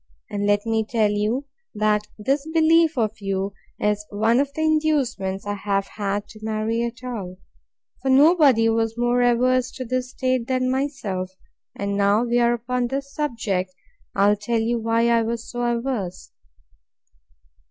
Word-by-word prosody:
And 205 Hz, 0 st, -1 dB
let 205 Hz, +1 st, +2 dB
me 225 Hz, -1 st, +1 dB
tell 220 Hz, -1 st, +1 dB
you, 215 Hz, +7 st, -1 dB, 0.3 s
that 210 Hz, 0 st, +1 dB
this 275 Hz, +8 st, -1 dB
belief 325 Hz, -1 st, +4 dB
of 220 Hz, -3 st, +1 dB
you 195 Hz, 0 st, -2 dB, 0.3 s
is 210 Hz, 0 st, 0 dB
one 220 Hz, +4 st, +2 dB
of 280 Hz, 0 st, 0 dB
the 315 Hz, -, -2 dB
inducements 280 Hz, -12 st, 0 dB
I 205 Hz, -, -2 dB
have 200 Hz, -1 st, -1 dB
had 205 Hz, 0 st, -3 dB
to 215 Hz, -, -13 dB
marry 220 Hz, +1 st, -1 dB
at 235 Hz, +1 st, -4 dB
all: 200 Hz, -8 st, -5 dB, 0.6 s
for 270 Hz, -, -1 dB
nobody 275 Hz, -4 st, +5 dB
was 225 Hz, 0 st, 0 dB
more 240 Hz, +1 st, +2 dB
averse 250 Hz, +1 st, +3 dB
to 255 Hz, -, -6 dB
this 255 Hz, +1 st, -2 dB
state 255 Hz, -2 st, -1 dB
than 255 Hz, -1 st, 0 dB
myself; 260 Hz, -10 st, -2 dB, 0.5 s
and, 200 Hz, 0 st, -2 dB
now 200 Hz, +3 st, +3 dB
we 240 Hz, 0 st, +1 dB
are 240 Hz, 0 st, +3 dB
upon 245 Hz, +1 st, -1 dB
this 275 Hz, +2 st, -4 dB
subject, 205 Hz, -10 st, -2 dB, 0.4 s
I'll 200 Hz, +1 st, +4 dB
tell 225 Hz, +3 st, -1 dB
you 230 Hz, +1 st, 0 dB
why 230 Hz, +1 st, +1 dB
I 235 Hz, -1 st, +4 dB
was 230 Hz, +1 st, -3 dB
so 240 Hz, -, -5 dB
averse. 235 Hz, -6 st, -2 dB
230 Hz, 160 wpm, -23 LUFS, 210-255 Hz, 0.6 s, nobody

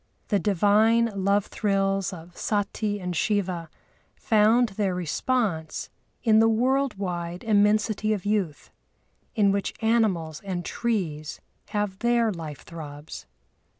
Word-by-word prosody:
The 205 Hz, -, +2 dB
divine 215 Hz, +4 st, +3 dB
love 200 Hz, 0 st, +3 dB
thrills 195 Hz, -2 st, 0 dB
of 175 Hz, -1 st, -11 dB
Sati 205 Hz, 0 st, -1 dB
and 180 Hz, -2 st, -4 dB
Shiva 185 Hz, -6 st, -1 dB, 0.5 s
found 225 Hz, +2 st, +3 dB
their 195 Hz, -2 st, -1 dB
response 180 Hz, -, -1 dB, 0.3 s
in 220 Hz, -3 st, +5 dB
the 225 Hz, 0 st, +5 dB
world 260 Hz, +4 st, +1 dB
wide 175 Hz, -2 st, -4 dB
immensity 215 Hz, 0 st, +2 dB
of 205 Hz, -3 st, -2 dB
youth, 200 Hz, -8 st, -1 dB, 0.6 s
in 205 Hz, -3 st, +4 dB
which 200 Hz, 0 st, -2 dB
animals 210 Hz, -9 st, +1 dB
and 180 Hz, -3 st, -4 dB
trees 170 Hz, -10 st, -2 dB, 0.3 s
have 205 Hz, -2 st, -2 dB
their 235 Hz, -2 st, +2 dB
life 160 Hz, -6 st, -7 dB
throbs. 150 Hz, -, -9 dB
205 Hz, 115 wpm, -26 LUFS, 175-220 Hz, 0.6 s, in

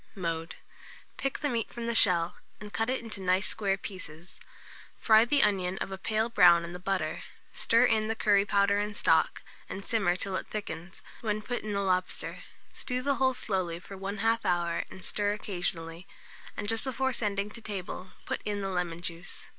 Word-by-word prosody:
Mode. 165 Hz, -3 st, -3 dB, 0.6 s
Pick 275 Hz, 0 st, -2 dB
the 295 Hz, -, +1 dB
meat 235 Hz, -5 st, -1 dB
from 235 Hz, -1 st, -5 dB
the 235 Hz, -, 0 dB
shell, 180 Hz, -5 st, +5 dB, 0.2 s
and 210 Hz, 0 st, -9 dB
cut 225 Hz, +2 st, 0 dB
it 260 Hz, -, 0 dB
into 215 Hz, -4 st, -4 dB
nice 185 Hz, +1 st, +2 dB
square 195 Hz, -1 st, 0 dB
pieces; 175 Hz, -4 st, -8 dB, 0.6 s
fry 220 Hz, 0 st, +6 dB
the 285 Hz, +3 st, +4 dB
onions 190 Hz, -2 st, +1 dB
of -, -, -3 dB
a 190 Hz, -, -4 dB
pale 220 Hz, +3 st, +1 dB
brown 175 Hz, -7 st, +6 dB
in 170 Hz, +1 st, -6 dB
the 180 Hz, -, -6 dB
butter, 185 Hz, -4 st, -1 dB, 0.3 s
stir 230 Hz, +2 st, +4 dB
in 220 Hz, -3 st, +2 dB
the 225 Hz, -, -1 dB
curry 205 Hz, -2 st, +4 dB
powder 200 Hz, 0 st, +3 dB
and 210 Hz, 0 st, -3 dB
stock, -, -, +3 dB, 0.3 s
and 195 Hz, -, -6 dB
simmer 200 Hz, -6 st, +2 dB
till 190 Hz, +1 st, -3 dB
it -, -, -5 dB
thickens, 185 Hz, -4 st, -6 dB, 0.2 s
when 215 Hz, -1 st, -1 dB
put 245 Hz, +2 st, -3 dB
in 215 Hz, -1 st, -4 dB
the 200 Hz, -, 0 dB
lobster; 185 Hz, -1 st, 0 dB, 0.3 s
stew 250 Hz, 0 st, -2 dB
the 280 Hz, 0 st, +1 dB
whole 260 Hz, -1 st, +4 dB
slowly 185 Hz, -7 st, -1 dB
for 195 Hz, +3 st, -10 dB
1/2 205 Hz, +4 st, 0 dB
hour, 175 Hz, -1 st, 0 dB
and 190 Hz, -, -9 dB
stir 205 Hz, 0 st, +1 dB
occasionally; 175 Hz, -4 st, -3 dB, 0.5 s
and 205 Hz, -, -3 dB
just 225 Hz, +1 st, +2 dB
before 265 Hz, 0 st, 0 dB
sending 205 Hz, -3 st, -1 dB
to 230 Hz, -, -9 dB
table, 190 Hz, -3 st, -5 dB, 0.2 s
put -, -, -3 dB
in 205 Hz, -1 st, -2 dB
the 195 Hz, -, -2 dB
lemon 175 Hz, -2 st, -2 dB
juice. 170 Hz, +1 st, -6 dB
200 Hz, 190 wpm, -29 LUFS, 180-220 Hz, 0.6 s, fry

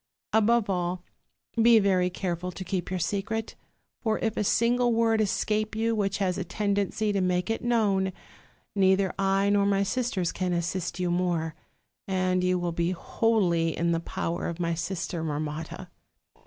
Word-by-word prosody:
Above 220 Hz, 0 st, +3 dB
all, 180 Hz, -1 st, -1 dB, 0.6 s
be 230 Hz, 0 st, +7 dB
very 190 Hz, -3 st, +3 dB
careful 180 Hz, -1 st, -3 dB
to 185 Hz, -, -7 dB
keep 185 Hz, -1 st, -3 dB
your 185 Hz, -, -1 dB
secret; 210 Hz, +5 st, -2 dB, 0.5 s
for 220 Hz, -2 st, +1 dB
if 220 Hz, -1 st, -1 dB
a -, -, 0 dB
single 240 Hz, +3 st, +2 dB
word 225 Hz, -1 st, +3 dB
escape 215 Hz, +1 st, 0 dB
you 225 Hz, +1 st, +1 dB
which 200 Hz, -2 st, 0 dB
has 190 Hz, -2 st, 0 dB
a -, -, -1 dB
tendency 205 Hz, +2 st, -1 dB
to 195 Hz, -, +1 dB
make 180 Hz, +2 st, 0 dB
it 225 Hz, -, -3 dB
known, 205 Hz, -5 st, +2 dB, 0.6 s
neither 190 Hz, -1 st, +3 dB
I 195 Hz, +1 st, +2 dB
nor 200 Hz, -1 st, +3 dB
my 200 Hz, 0 st, +2 dB
sisters 200 Hz, -5 st, -1 dB
can 180 Hz, -1 st, -2 dB
assist 175 Hz, +1 st, -2 dB
you 180 Hz, -1 st, 0 dB
more; 175 Hz, -3 st, 0 dB, 0.5 s
and 185 Hz, -1 st, +1 dB
you 180 Hz, 0 st, +2 dB
will 175 Hz, -1 st, -1 dB
be 170 Hz, +1 st, 0 dB
wholly 175 Hz, -5 st, +1 dB
in 170 Hz, 0 st, +1 dB
the 165 Hz, -, +1 dB
power 170 Hz, 0 st, -3 dB
of 170 Hz, 0 st, -5 dB
my 170 Hz, -1 st, 0 dB
sister 170 Hz, -1 st, -3 dB
Mar 150 Hz, -2 st, -2 dB
motta.' 160 Hz, +4 st, -5 dB
190 Hz, 170 wpm, -27 LUFS, 175-215 Hz, 0.6 s, be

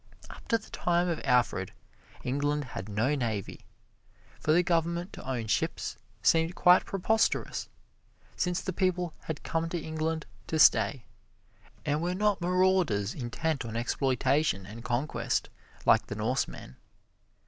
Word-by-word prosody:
Up -, -, -13 dB
to 230 Hz, -, +3 dB
the 220 Hz, -, -16 dB
time 175 Hz, 0 st, +1 dB
of 170 Hz, -, -2 dB
Alfred, 125 Hz, -3 st, +1 dB, 0.5 s
England 145 Hz, +3 st, 0 dB
had 105 Hz, -5 st, -7 dB
no 110 Hz, +8 st, +1 dB
navy. 115 Hz, -8 st, -3 dB, 0.7 s
For 155 Hz, -, +1 dB
the 175 Hz, +3 st, +5 dB
government 170 Hz, +2 st, 0 dB
to -, -, -8 dB
own 120 Hz, -4 st, -2 dB
ships 105 Hz, -, -1 dB, 0.3 s
seemed 165 Hz, +2 st, +3 dB
quite 180 Hz, +1 st, +6 dB
preposterous, 220 Hz, +3 st, 0 dB, 0.7 s
since 180 Hz, -1 st, 0 dB
the 185 Hz, -, -3 dB
people 180 Hz, -2 st, 0 dB
had 160 Hz, -3 st, -5 dB
come 165 Hz, 0 st, -1 dB
to 175 Hz, -, -2 dB
England 160 Hz, 0 st, -2 dB, 0.2 s
to 160 Hz, -, -1 dB
stay, 135 Hz, -4 st, +5 dB, 0.8 s
and 145 Hz, +2 st, 0 dB
were 175 Hz, +1 st, -1 dB
not 210 Hz, -1 st, +1 dB
marauders 180 Hz, -, +2 dB
intent 140 Hz, +4 st, -2 dB
on 115 Hz, -1 st, -6 dB
exploitation 130 Hz, -3 st, +1 dB
and 110 Hz, +4 st, -9 dB
conquest, 125 Hz, +6 st, -1 dB, 0.3 s
like -, -, +4 dB
the -, -, -5 dB
Norsemen. 110 Hz, -, -2 dB
155 Hz, 135 wpm, -29 LUFS, 120-175 Hz, 0.8 s, quite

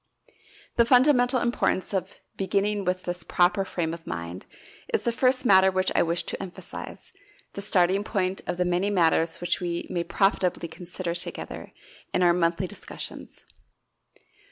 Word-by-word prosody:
The 235 Hz, -, +6 dB
fundamental 250 Hz, 0 st, +4 dB
importance 235 Hz, -5 st, 0 dB
of 190 Hz, 0 st, -3 dB
beginning 200 Hz, +1 st, 0 dB
with 185 Hz, 0 st, -1 dB
this 175 Hz, -1 st, -2 dB
"proper 180 Hz, +4 st, +2 dB
frame 165 Hz, -4 st, -3 dB
of 165 Hz, -1 st, -10 dB
mind" 85 Hz, +2 st, -6 dB, 0.4 s
is -, -, 0 dB
the 235 Hz, -, +1 dB
first 255 Hz, +2 st, +2 dB
matter 190 Hz, -3 st, +6 dB
which 185 Hz, 0 st, 0 dB
I -, -, +3 dB
wish 170 Hz, +1 st, 0 dB
to -, -, -5 dB
emphasize, 190 Hz, -2 st, -8 dB, 0.4 s
the 200 Hz, -, -5 dB
starting 195 Hz, 0 st, +2 dB
point 190 Hz, -3 st, -1 dB
of 175 Hz, -, -2 dB
the 180 Hz, -, +1 dB
many 180 Hz, +3 st, +1 dB
matters 165 Hz, -3 st, +2 dB
which 175 Hz, 0 st, -1 dB
we 170 Hz, -1 st, -2 dB
may 170 Hz, -, -1 dB
profitably 180 Hz, 0 st, +1 dB
consider 175 Hz, +1 st, -5 dB
together 170 Hz, -, -5 dB, 0.4 s
in 180 Hz, -, +3 dB
our 175 Hz, -1 st, +5 dB
monthly 170 Hz, +1 st, +1 dB
discussions. 205 Hz, +3 st, -9 dB
185 Hz, 155 wpm, -26 LUFS, 175-200 Hz, 0.4 s, The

